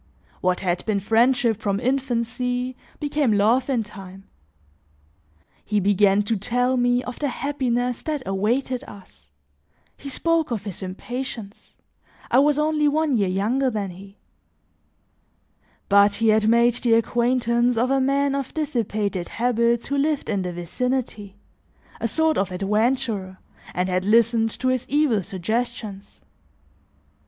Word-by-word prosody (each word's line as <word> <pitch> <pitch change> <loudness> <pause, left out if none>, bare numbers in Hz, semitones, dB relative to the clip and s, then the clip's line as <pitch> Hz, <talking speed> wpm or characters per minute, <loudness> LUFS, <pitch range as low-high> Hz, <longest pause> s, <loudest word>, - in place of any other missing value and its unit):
What 180 0 +1
had 180 -2 -1
been 210 -2 +1
friendship 230 +2 +2
from 200 -2 -1
infancy, 250 0 -1 0.2
became 290 -4 0
love 225 +6 +2
in 245 -4 +1
time. 195 -2 -11 1.4
He 210 0 0
began 200 +1 +3
to 225 +2 -1
tell 245 +5 0
me 245 0 +2
of 250 - -7
the 295 - 0
happiness 250 -3 -1
that 300 -4 -3
awaited 240 +7 -1
us; 190 - -14 0.7
he 280 - -9
spoke 330 +4 0
of 225 -5 -3
his 200 -3 -7
impatience, 215 +2 -7 0.6
I 250 - +5
was 290 +1 +3
only 300 0 +2
one 300 -1 +1
year 200 -4 +2
younger 225 +8 +1
than 205 -5 -3
he; 195 +3 -13 1.7
but 200 0 +5
he 225 0 +2
had 215 0 +3
made 235 +1 +4
the 240 -1 +1
acquaintance 240 +1 +2
of 250 +3 +1
a 270 0 +2
man 275 +1 +1
of 275 -2 -4
dissipated 215 - -2
habits 235 0 +1
who 280 0 -1
lived 295 0 0
in 200 -3 0
the 180 -1 -3
vicinity, 205 +3 -3 0.6
a 230 - 0
sort 320 +5 +1
of 195 -1 -1
adventurer, 205 0 -1 0.4
and 180 +1 0
had 185 0 0
listened 225 +1 +3
to 255 - +2
his 255 0 -1
evil 285 -7 +2
suggestions. 210 +2 -4
235 Hz, 135 wpm, -23 LUFS, 200-260 Hz, 1.7 s, I